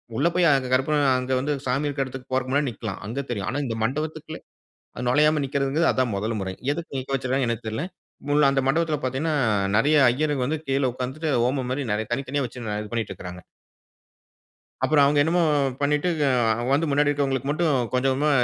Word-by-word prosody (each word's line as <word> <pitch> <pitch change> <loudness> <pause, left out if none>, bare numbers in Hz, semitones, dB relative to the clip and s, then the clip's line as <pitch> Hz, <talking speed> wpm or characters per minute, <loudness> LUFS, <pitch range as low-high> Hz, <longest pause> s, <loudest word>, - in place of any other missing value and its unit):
உள்ள 165 - +2
போய் 180 -1 +4
அங்க 135 -2 0
கற்பூரம் 145 +3 +2
அங்க 125 +1 -3
வந்து 145 +3 -2 0.2
சாமி 135 +4 0
இருக்க 140 -1 -1
இடத்துக்கு 130 0 -9
போறக்கு 130 0 -1
முன்னாடி 140 0 +1
நிக்கலாம், 110 -4 -6
அங்க 120 +7 -3
தெரியும். 100 -6 -3
ஆனா 145 +4 -2
இந்த 115 -3 -3
மண்டபத்துக்குள்ள 155 +5 -3 0.6
அ - - -4
நுழையாம 150 +4 +3
நிற்கிறதுங்குறது, 140 +4 +1
அதான் 130 -3 0
முதல் 110 +3 -2
முறை. 95 -1 -3 0.2
எதுக்கு 160 -1 -4
நிக்க 130 +1 -5
வச்சுருக்காங்கன்னு 130 -1 0
எனக்கு 110 - -12
தெரியல. 110 +7 -3 0.4
முள் 145 -1 +4
அந்த 135 0 +1
மண்டபத்துல 155 +2 +1
பார்த்தீங்கன்னா, 135 +5 -1 0.4
நெறைய 145 +7 +3
ஐயர்ங்க 145 0 0
வந்து 155 +4 -1
கீழ 135 +1 0
உட்கார்ந்துட்டு 130 +6 -3
ஹோமம் 130 0 -1
மாரி, 140 +2 -2
நெறை 105 +1 -1
தனித்தனியா 135 +3 -1
வச்சு 120 -1 -9
நா 105 - -2
இது 105 - -10
பண்ணிட்டு 115 -3 -2
இருக்குறாங்க. 90 0 -9 1.4
அப்புறம் 150 -2 +4
அவங்க 145 +1 +3
என்னமோ 170 +3 +2 0.4
பண்ணிட்டு 150 +4 +1 0.2
அ 120 -3 +2
வந்து 145 +4 +3
முன்னாடி 145 +1 +3
இருக்கவங்களுக்கு 135 -2 -1
மட்டும் 155 +1 +1 0.2
கொஞ்ச 125 +1 +1
கொஞ்சமா 145 +3 +1
135 Hz, 185 wpm, -24 LUFS, 125-150 Hz, 1.4 s, போய்